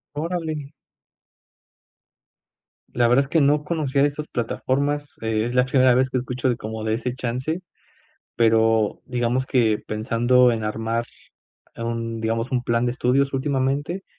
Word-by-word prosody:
Órale. 155 -2 -3 2.2
La 120 -1 +3
verdad 125 +3 +5
es - - -12
que 160 - +2
no 145 +1 +3
conocía 150 -4 0
de 145 - +4
estas 150 +1 -7
plataformas, 140 +5 -2
e 110 -1 0
es 120 +1 -3
la 125 0 +4
primera 130 -1 +4
vez 130 +1 +2
que 130 - 0
escucho 125 0 -1
de 120 - -1
como 110 0 -5
de 110 - 0
ese 125 +1 -3
chance, 130 +8 -3 0.7
pero 110 -1 +2
digamos 125 +1 -1
que 110 -4 +2
pensando 120 +3 +3
en 110 -1 -3
armar, 115 +2 -2 0.7
eh, - - -7
un 115 -1 -3
digamos, 115 +3 -2
un 125 -1 +1
plan 115 0 +1
de 120 - 0
estudios 135 +2 +1
últimamente. 140 +6 -1
125 Hz, 150 wpm, -23 LUFS, 115-140 Hz, 2.2 s, verdad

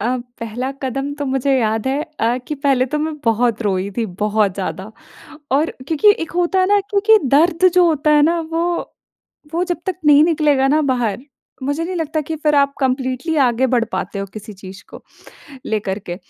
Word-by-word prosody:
अ, 245 +4 0 0.2
पहला 240 +4 -4
कदम 275 +2 -3
तो 290 - -2
मुझे 270 +1 +1
याद 220 0 -1
है 280 +3 0 0.2
अ, 235 +2 +2
कि 300 - -2
पहले 270 -2 +1
तो - - +1
मैं 310 0 -2
बहुत 230 0 +1
रोई 195 -1 -1
थी, 230 -2 0
बहुत 205 +1 0
ज़्यादा 195 +1 -5 0.6
और 295 +4 +2 0.2
क्योंकि 330 +7 +5
एक - - -9
होता 355 +2 +1
है 370 - +4
ना 410 0 +4
क्योंकि 425 +2 +4 0.2
दर्द 340 +4 +4
जो 360 -1 +5
होता 305 -1 +1
है 295 - +5
ना 335 +2 +2
वो 330 +1 0 0.9
वो 345 +2 +1
जब 350 -1 -2
तक 375 -3 -2
नहीं 295 0 +7
निकलेगा 295 -5 +2
ना 305 +3 +3
बाहर 235 -2 -2 0.4
मुझे 285 +4 -1
नहीं 365 +2 -4
लगता 315 -1 -2
कि 320 +2 -5
फिर 300 -1 +1
आप 280 0 +3
कम्प्लीटली 260 +3 -1
आगे 245 +1 +2
बढ़ 235 -2 +3
पाते 200 - -4
हो 195 - -3
किसी 215 0 -9
चीज़ 190 +1 -12
को - - -11 0.6
लेकर 210 -2 -2
के। 175 -2 -7
270 Hz, 195 wpm, -18 LUFS, 225-315 Hz, 0.9 s, नहीं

